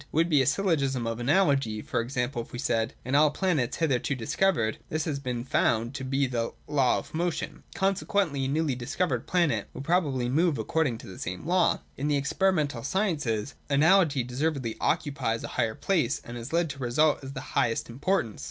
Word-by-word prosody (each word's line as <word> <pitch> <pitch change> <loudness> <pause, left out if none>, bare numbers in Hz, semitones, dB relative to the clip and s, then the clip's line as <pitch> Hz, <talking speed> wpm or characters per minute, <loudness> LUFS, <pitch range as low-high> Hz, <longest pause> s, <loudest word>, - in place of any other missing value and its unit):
It - - -16
would 165 +3 +3
be 150 -4 +4
a 130 - +1
syllogism 140 -6 +1
of 115 0 -3
Analogy, 135 - +2
for - - -1
example, 125 0 -2
if - - -12
we - - -6
said: 115 -2 0
In 130 - -3
all 150 +2 +6
planets 150 -7 0
hitherto 140 -3 +1
discovered 120 - 0
this 155 0 -1
has 145 -4 -2
been 125 -3 -3
found 120 -1 +1
to 140 -1 -5
be 135 +1 +1
the 120 -3 -2
law 140 -4 +2
of - - -7
motion, 170 +1 -2
consequently 190 -7 0
a - - 0
newly 150 0 0
discovered 130 +9 -2
planet 155 - +1
will - - -5
probably 140 -7 +1
move 155 +3 +2
according 130 +2 0
to 115 - -12
the 95 - -10
same 90 0 -5
law. 180 +1 +2 0.2
In 145 - -2
the 145 -1 +2
experiential 145 -2 +1
sciences 145 - -1 0.2
Analogy 155 -1 +4
deservedly 130 -1 -2
occupies 140 -8 0
a - - -5
high 115 -3 0
place, 155 - 0
and 120 - -8
has 120 +2 -7
led 170 -2 +1
to 140 - -10
results 140 +5 +2
of 135 0 -7
the 130 - -4
highest 115 -1 +1
importance. 125 - -1
140 Hz, 190 wpm, -27 LUFS, 120-160 Hz, 0.2 s, all